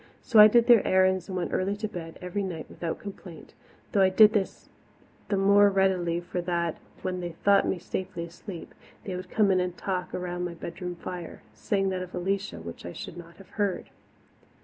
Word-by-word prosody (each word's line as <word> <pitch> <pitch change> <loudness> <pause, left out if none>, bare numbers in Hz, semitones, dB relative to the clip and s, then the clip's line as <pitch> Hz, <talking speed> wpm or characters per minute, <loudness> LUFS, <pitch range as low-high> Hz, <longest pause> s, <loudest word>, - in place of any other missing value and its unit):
So 230 -4 +4
I 210 - +12
did 235 +2 +4
their 240 -4 +7
errands 185 -1 +2
and 190 -2 -4
went 175 - -3
early 195 +2 0
to 215 +1 -3
bed 170 -6 -8
every 180 +3 -2
night 175 -5 -4
without 165 -2 -4
complaint 190 -5 -10 0.4
though 200 - +3
I 190 - +6
did 210 +3 +7
this 200 -4 -2 0.6
the 200 - +1
more 200 +1 +6
readily 185 -3 +1
for 175 +1 -4
that, 170 -2 -2 0.2
when 185 -1 -2
they 175 -1 -5
thought 200 +4 +3
me - - 0
safely 180 0 -5
asleep, 170 +1 -9 0.3
they 185 - -4
would 180 0 -7
come 210 -3 +3
in 185 - +3
and 180 -1 -2
talk 185 -2 -3
around 180 0 -3
my 175 -1 -4
bedroom 175 +1 -6
fire, 175 -1 -8
saying 195 - 0
that 185 -1 -2
of 185 0 -7
Alicia 195 +3 -2
which 85 - -9
I 85 - -7
should - - -8
not 170 -1 -11
have 195 - -15
heard. 205 -3 -2
185 Hz, 200 wpm, -27 LUFS, 175-200 Hz, 0.6 s, I